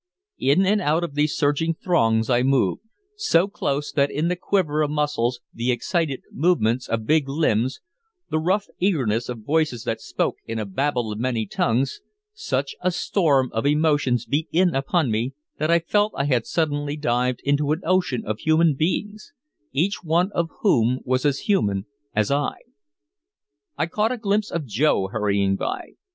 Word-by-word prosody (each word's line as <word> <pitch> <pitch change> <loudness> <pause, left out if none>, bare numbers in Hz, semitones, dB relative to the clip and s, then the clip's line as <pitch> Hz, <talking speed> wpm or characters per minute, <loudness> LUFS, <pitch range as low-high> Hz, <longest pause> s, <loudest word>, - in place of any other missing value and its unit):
In 160 +8 +3
and 205 +2 +2
out 160 +1 +1
of 170 - -4
these 150 +1 0
surging 150 +3 +1
throngs 115 -11 +1
I 125 -1 +3
moved, 130 -8 +2 0.4
so 185 - +3
close 145 -7 -2
that 140 -2 +2
in 155 +4 -1
the 180 - 0
quiver 175 -5 0
of 150 - +1
muscles, 145 -5 -1
the 120 +2 0
excited 140 +3 -1
movements 130 -7 +1
of 110 -1 -1
big 150 -1 +2
limbs, 130 -4 0 0.5
the 155 - 0
rough 190 +6 +1
eagerness 125 - 0
of 120 -3 -6
voices 150 -4 0
that 115 - -3
spoke - - -2
in 115 - -3
a 110 - -2
babel 120 +2 -1
of 105 - -5
many 120 -2 -1
tongues, 125 +6 0 0.3
such 445 0 -2
a - - +2
storm 150 -7 +1
of 115 +5 0
emotions 145 -5 +2
beat 150 +4 -1
in 180 +1 +3
upon 135 0 +1
me 120 +5 -1 0.2
that 155 - 0
I 170 - +5
felt 205 +5 +1
I 140 - +1
had 125 -5 +1
suddenly 145 -2 -1
dived 125 -3 0
into 145 +1 +1
an 160 +4 0
ocean 180 -8 +1
of 110 +1 -3
human 160 0 +3
beings, 205 +8 -2 0.4
each 175 +9 0
one 170 +4 +1
of 170 -3 -1
whom 125 - +2
was 130 +2 0
as 140 -1 +1
human 105 - +1 0.3
as 105 +2 +1
I. 145 0 0 1.2
I - - +1
caught 210 +7 0
a 250 - -2
glimpse 210 -1 0
of 170 -3 -3
Joe 110 -4 +1
hurrying 100 -2 +1
by. - - -4
145 Hz, 170 wpm, -23 LUFS, 120-170 Hz, 1.2 s, I